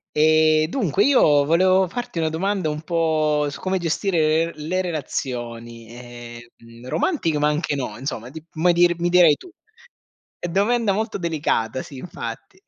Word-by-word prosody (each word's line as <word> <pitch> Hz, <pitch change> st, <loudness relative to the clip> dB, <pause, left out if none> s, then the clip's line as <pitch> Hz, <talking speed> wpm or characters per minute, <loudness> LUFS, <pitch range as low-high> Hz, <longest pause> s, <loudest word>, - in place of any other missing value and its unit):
Ehm, 155 Hz, 0 st, +4 dB
dunque 195 Hz, -, 0 dB
io 150 Hz, -, +4 dB
volevo 185 Hz, +5 st, +3 dB
farti 240 Hz, -2 st, -5 dB
una 160 Hz, -, +1 dB
domanda 185 Hz, +1 st, -1 dB
un 150 Hz, +1 st, -4 dB
po' 155 Hz, -3 st, +1 dB
su 140 Hz, -, -9 dB
come 190 Hz, 0 st, -1 dB
gestire 165 Hz, -2 st, +1 dB
l 150 Hz, +1 st, -8 dB
le 185 Hz, +2 st, 0 dB
relazioni, 120 Hz, -7 st, -5 dB
ehm, 120 Hz, 0 st, -12 dB
romantiche 165 Hz, -, 0 dB
ma 150 Hz, -, +2 dB
anche 150 Hz, 0 st, -1 dB
no, 125 Hz, -6 st, -4 dB
insomma 125 Hz, -2 st, -5 dB
ti 160 Hz, +2 st, -11 dB
mi 170 Hz, +2 st, +2 dB
dir 175 Hz, 0 st, +4 dB
mi 175 Hz, +1 st, 0 dB
dirai 175 Hz, -3 st, +6 dB
tu. 365 Hz, -, -14 dB, 1.0 s
Domanda 210 Hz, +4 st, +1 dB
molto 215 Hz, +2 st, -2 dB
delicata 145 Hz, -, -1 dB
sì, 140 Hz, -, -11 dB
infatti. 375 Hz, -, -8 dB
160 Hz, 150 wpm, -22 LUFS, 140-180 Hz, 1.0 s, dirai